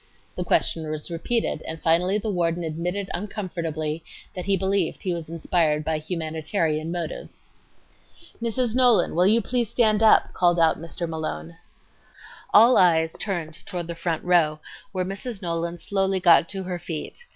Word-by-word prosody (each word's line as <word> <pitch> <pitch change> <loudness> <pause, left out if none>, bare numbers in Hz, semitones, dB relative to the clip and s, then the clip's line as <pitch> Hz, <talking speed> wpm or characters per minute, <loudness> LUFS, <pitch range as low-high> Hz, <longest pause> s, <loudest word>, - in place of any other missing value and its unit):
The - - -2
question 160 -2 0
was 155 +2 -5
repeated, 170 0 -1
and 160 0 -5
finally 175 +5 +2
the 215 0 -3
warden 170 -2 0
admitted 175 +5 -3
uncomfortably 165 -5 -4 0.3
that 180 - -6
he 195 0 +2
believed 190 -2 -1
he 185 - -1
was 165 -2 -6
inspired 160 -2 0
by 160 -1 0
"humanitarian 160 0 -2
motives." 170 -3 -6 0.9
"Mrs. 235 0 0
Nolan, 245 -7 +4
will 180 +3 +4
you 225 +2 +4
please 240 -2 0
stand 220 -3 +2
up?" 220 - +5
called 175 -1 +2
out 165 -1 +3
Mr. 170 +1 -4
Malone. 85 - -5 1.0
All 230 +4 +7
eyes 160 -3 +4
turned 165 -6 -4
toward 175 -3 -4
the 170 - -5
front 165 -1 -3
row, 165 -4 +3 0.3
where 185 -2 -2
Mrs. 195 +4 -5
Nolan 170 0 -2
slowly 195 0 -1
got 170 -2 +5
to 195 -1 -4
her 180 -1 -4
feet. 175 - -7
175 Hz, 155 wpm, -24 LUFS, 160-195 Hz, 1.0 s, All